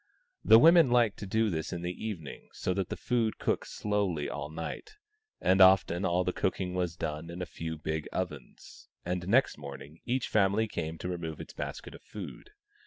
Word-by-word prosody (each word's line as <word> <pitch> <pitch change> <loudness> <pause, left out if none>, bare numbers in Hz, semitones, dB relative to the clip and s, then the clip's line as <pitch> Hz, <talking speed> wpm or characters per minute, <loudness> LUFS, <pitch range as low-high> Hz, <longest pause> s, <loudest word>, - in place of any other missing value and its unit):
The 110 - +8
women 165 +2 +7
liked 120 -4 +3
to 100 - -6
do 110 +2 +1
this 80 -1 -3
in 85 -1 -4
the 90 0 -2
evening, 90 -10 -6
so 90 - -1
that 95 -1 -2
the - - -4
food 115 -3 0
cooked - - -1
slowly 100 -7 -1
all 75 +1 -5
night; 85 - -6 0.4
and 95 +1 +3
often 95 -1 +5
all 90 +1 +2
the 90 - -1
cooking 95 -1 -1
was 90 -2 -1
done 80 0 -4
in 85 +1 -7
a 90 - -2
few 80 -2 -6
big 80 0 -3
ovens, 75 -9 -6 0.2
and 90 0 -2
next 120 - +3
morning 70 +2 -9
each 125 +1 -1
family 105 +1 +2
came 80 -5 -4
to 90 - -5
remove 85 -3 -4
its - - -9
basket - - -6
of - - -12
food. 105 - -9
90 Hz, 190 wpm, -30 LUFS, 80-105 Hz, 0.4 s, The